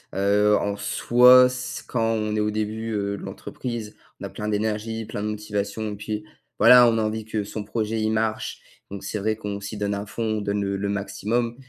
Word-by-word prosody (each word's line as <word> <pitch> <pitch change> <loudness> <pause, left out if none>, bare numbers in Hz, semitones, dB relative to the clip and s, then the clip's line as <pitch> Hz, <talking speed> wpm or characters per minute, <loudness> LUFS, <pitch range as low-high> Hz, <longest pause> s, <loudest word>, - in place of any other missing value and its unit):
heu, 105 +1 +3
en 100 0 -1
soi, 125 +5 +6
s 125 0 -4
quand 120 - -1
on 110 -1 0
est - - 0
au 105 0 +1
début, 110 +1 -3
heu, 100 -1 -1
de - - -10
l'entreprise, 115 -4 -6 0.2
on - - -10
a - - -5
plein 105 - -6
d'énergie, 110 +1 -2
plein 105 - -5
de 105 - -2
motivation 105 0 -3
et - - -5
puis, 105 +1 -5 0.3
voilà, 125 -1 +8
on 115 - +1
a 110 - +1
envie 110 0 -2
que 110 -1 -2
son 105 +1 -6
projet 110 +1 -2
il 110 - +1
marche, 110 0 -1 0.3
donc 100 -1 -7
c'est 105 +2 -3
vrai 110 +2 0
qu'on 105 -2 -5
s'y 105 +2 -6
donne 105 0 -1
à 100 +1 -4
fond, 115 - -4 0.2
on - - -4
donne 100 0 -1
le 100 0 -1
le 100 +1 -2
maximum, 115 +4 -2
105 Hz, 220 wpm, -24 LUFS, 105-110 Hz, 0.3 s, voilà